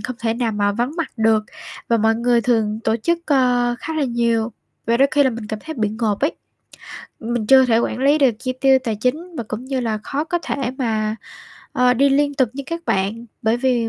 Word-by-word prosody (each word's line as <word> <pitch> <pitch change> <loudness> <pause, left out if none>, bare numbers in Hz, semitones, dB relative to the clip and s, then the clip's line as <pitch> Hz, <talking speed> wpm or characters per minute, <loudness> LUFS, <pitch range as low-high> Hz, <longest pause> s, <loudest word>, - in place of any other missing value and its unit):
không 250 -1 -5
thể 225 -1 -1
nào 235 -2 -1
mà 205 -1 +1
vắng 240 +7 -1
mặt 335 - -2
được 220 -1 +2 0.4
và 235 - +3
mọi 225 0 +2
người 235 +1 +2
thường 220 -2 0
tổ 220 - +2
chức, 335 +9 0
ơ, 250 -4 +2
khá 320 - -5
là 305 -2 +1
nhiều 235 -2 0 0.3
và 230 +1 +3
đôi 275 +3 +4
khi 290 -2 +3
là 265 - +3
mình 230 -2 -6
cảm 215 0 -4
thấy 315 +6 -7
bị 215 - +1
ngộp 215 -1 -2
ấy. 290 +4 +1 0.9
Mình 230 -1 -2
chưa 265 +2 +7
thể 230 -2 +3
quản 240 - -1
lý 280 +3 +3
được 275 -4 +5
chi 255 +1 -3
tiêu 270 -1 +5
tài 225 -2 -1
chính 310 - -2
và 235 - -3
cũng 220 +4 -5
như 260 0 -2
là 225 -3 -1
khó 285 +6 -2
có 350 +2 -1
thể 260 -3 -2
mà, 220 -3 -1 0.6
ơ, 250 0 +3
đi 275 +3 +4
liên 285 +1 +2
tục 260 -4 +2
với 275 - -5
các 335 0 -5
bạn, 205 +5 -1 0.2
bởi 220 +1 +2
vì 240 -2 +1
240 Hz, 235 wpm, -20 LUFS, 225-270 Hz, 0.9 s, chưa